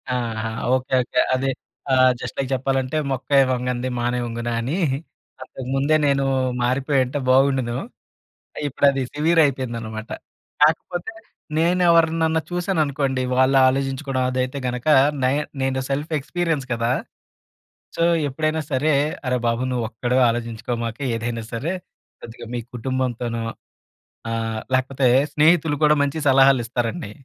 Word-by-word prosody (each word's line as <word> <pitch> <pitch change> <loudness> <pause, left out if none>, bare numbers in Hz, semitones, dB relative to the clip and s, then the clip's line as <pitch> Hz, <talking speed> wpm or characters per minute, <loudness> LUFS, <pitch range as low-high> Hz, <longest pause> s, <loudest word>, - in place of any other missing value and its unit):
ఆహా! 110 -2 -2 0.3
Okay. 130 0 -4
Okay. - - -1 0.2
అది 135 +1 -1 0.4
ఆహ్, 130 0 +6
జస్ట్ - - -7
లైక్ 135 -1 -2
చెప్పాలంటే 135 +2 -1
మొక్కై 135 +1 +2
వంగనిది 125 0 -2
మానై 120 +1 0
వంగునా 120 0 -3
అని 135 +10 -2 0.6
అంతకు 130 0 -8
ముందే 145 +3 +2
నేను 140 -1 +2 0.4
మారిపో‌యుంటే 130 +2 +1
బాగుం‌డును. 130 -2 +3 0.9
ఇప్పుడు 140 - +1
అది 135 -1 -2
సివిర్ 160 +3 +2
అయిపోయిందనమాట. 115 -5 -3 0.5
కాకపోతే 170 +6 +1 0.5
నేను 175 +3 +2
ఎవరినన్నా 160 -1 +3
చూశాననుకోండి 150 -7 0
వాళ్ళు 130 +1 +4
ఆలోచించుకోవడం 135 0 -1
అదైతే 130 +2 -2
గనక 125 0 -4 0.4
నై 130 +2 +3 0.3
నేను 130 0 0
సెల్ఫ్ 145 +4 -3
ఎక్స్పీరియన్స్ 160 -2 -2
కదా! 115 +1 0 1.1
సో, 170 - 0 0.3
ఎప్పుడైనా 155 +3 -1
సరే, 145 +4 +1 0.3
అరే 125 - +1
బాబు 115 +2 0
నువ్వొక్కడివే 125 +1 0
ఆలోచించుకోమాక 115 0 -4 0.2
ఏదైనా 115 0 -3
సరే. 145 +10 -2 0.5
కొద్దిగా 115 0 -10
మీ 120 - -2
కుటుంబంతోనో 120 -2 -2 0.9
ఆహ్, 115 -1 -2
లేకపోతే 130 0 +1 0.3
స్నేహితులు 155 0 +3
కూడా 150 0 +5
మంచి 145 +2 -1
సలహాలు 135 -1 +5
ఇస్తారండి. 115 -3 -3
130 Hz, 120 wpm, -22 LUFS, 120-145 Hz, 1.1 s, ఆహ్